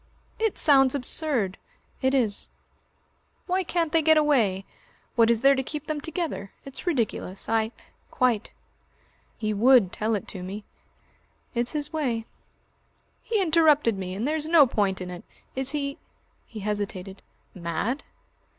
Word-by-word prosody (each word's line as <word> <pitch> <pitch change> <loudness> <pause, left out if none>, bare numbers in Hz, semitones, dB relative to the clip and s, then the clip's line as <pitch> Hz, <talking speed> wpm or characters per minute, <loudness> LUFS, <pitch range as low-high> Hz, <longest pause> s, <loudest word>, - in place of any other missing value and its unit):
"It 445 -2 0
sounds 270 -2 +5
absurd." 250 - -1 0.4
"It 265 0 +2
is." 220 -6 0 1.0
"Why 370 +1 0
can't 340 -3 -1
they 325 - +3
get 315 0 +5
away? 230 -11 +2 0.5
What 230 -2 +5
is 230 -1 +2
there 275 +1 +6
to 265 - 0
keep 295 +3 -6
them 305 -1 -3
together? 320 - -4
It's 275 +6 -10
ridiculous. 230 - -1
I 220 0 +1 0.2
" - - -39
"Quite." 240 -4 +1 0.9
"He 215 -1 -1
would 230 -2 +5
tell 220 +1 -1
it 200 - -5
to 190 - -7
me." 195 +3 -6 0.9
"It's 240 +2 0
his 300 +1 -2
way." 245 -8 -1 1.0
"He 445 - -1
interrupted 310 - +4
me. 185 -1 -5
And 220 +7 -2
there's 310 0 -1
no 320 -3 +7
point 200 -6 0
in 180 0 -5
it. 175 - -8 0.3
Is 265 0 +5
he 280 -1 -2 0.2
" - - -41
he 220 -2 -8
hesitated, 200 -2 -4 0.3
"mad?" 180 - -3
250 Hz, 150 wpm, -26 LUFS, 205-300 Hz, 1.0 s, no